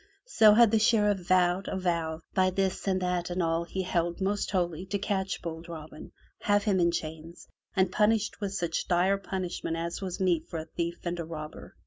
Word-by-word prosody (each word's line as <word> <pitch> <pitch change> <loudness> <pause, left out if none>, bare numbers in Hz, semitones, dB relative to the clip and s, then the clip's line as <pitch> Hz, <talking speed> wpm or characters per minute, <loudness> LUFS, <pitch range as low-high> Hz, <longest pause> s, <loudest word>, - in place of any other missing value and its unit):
So 220 - +6
had 235 -2 +6
the 220 - +4
Sheriff 210 -2 +3
vowed 185 0 +3
a - - -2
vow 165 -3 -1
by 185 -1 +3
this 190 +1 -1
and 190 -1 +2
that 180 -1 -1
and 180 0 -1
all 165 +1 0
he 190 +2 -3
held 170 -1 -1
most 200 +1 -1
holy 175 -3 -1
to 200 - -1
catch 195 -2 -2
bold 165 0 -6
Robin, 155 -2 -9 0.3
have 205 0 +2
him 200 -3 +2
in 170 -1 +4
chains, 160 +1 -6 0.3
and 190 -2 +2
punished 210 +1 +1
with 200 -2 -2
such 170 -3 -2
dire 185 +3 +2
punishment 180 -3 -3
as 170 +2 -4
was 185 -2 -4
meet 175 -4 +1
for 165 - -5
a 160 - -5
thief 170 +2 -4
and 175 0 -2
a - - -2
robber. 155 -2 -8
180 Hz, 200 wpm, -29 LUFS, 170-195 Hz, 0.3 s, So